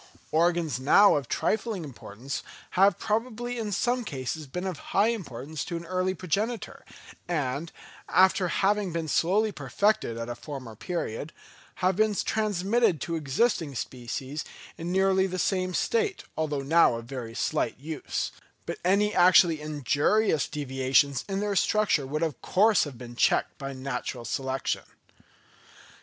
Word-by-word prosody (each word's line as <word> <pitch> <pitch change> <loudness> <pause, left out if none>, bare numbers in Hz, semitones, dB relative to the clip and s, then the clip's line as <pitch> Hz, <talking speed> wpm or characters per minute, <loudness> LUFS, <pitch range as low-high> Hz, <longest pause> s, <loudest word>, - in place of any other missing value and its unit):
Organs 165 -4 +2
now 200 +10 +6
of 140 -4 -2
trifling 215 - -1
importance 120 -1 -7 0.3
have 195 +2 +4
probably 240 +2 -2
in 215 -2 -3
some 245 +5 0
cases 145 - -4
been 180 +7 -5
of 180 -6 -3 0.2
high 205 +3 +5
importance 150 - -4
to 170 - -3
an 170 - -8
early 185 +1 -1
progenitor, 210 +7 -2 0.4
and, 155 -1 -2 0.4
after 185 0 +4
having 200 +2 +1
been 165 -1 -3
slowly 200 +8 +2
perfected 145 - 0
at 115 0 -4
a 120 - -3
former 130 -4 -8
period, 155 - -4 0.5
have 185 0 +3
been 215 +1 +2
transmitted 210 -2 +1
to 170 - -2
existing 155 - 0
species 130 +4 -5 0.3
in 170 +2 -5
nearly 190 0 +3
the 185 0 -4
same 185 +1 0
state, 430 - 0
although 150 -3 -1
now 160 -3 +4
of 115 0 -6
very 120 -3 -7
slight - - -1
use; 155 +2 -4 0.3
but - - -5
any 200 +3 +3
actually 175 -3 +5
injurious 150 - +1
deviations 135 -1 +1
in 195 0 -1
their 205 -1 -1
structure 195 -8 +2
would 155 +4 -2
of 160 -3 -2
course 205 0 +4
have 140 -5 -8
been 120 0 -9
checked - - +2
by 135 0 -4
natural 130 -2 -4
selection. 135 +1 -2
165 Hz, 145 wpm, -27 LUFS, 135-200 Hz, 0.5 s, now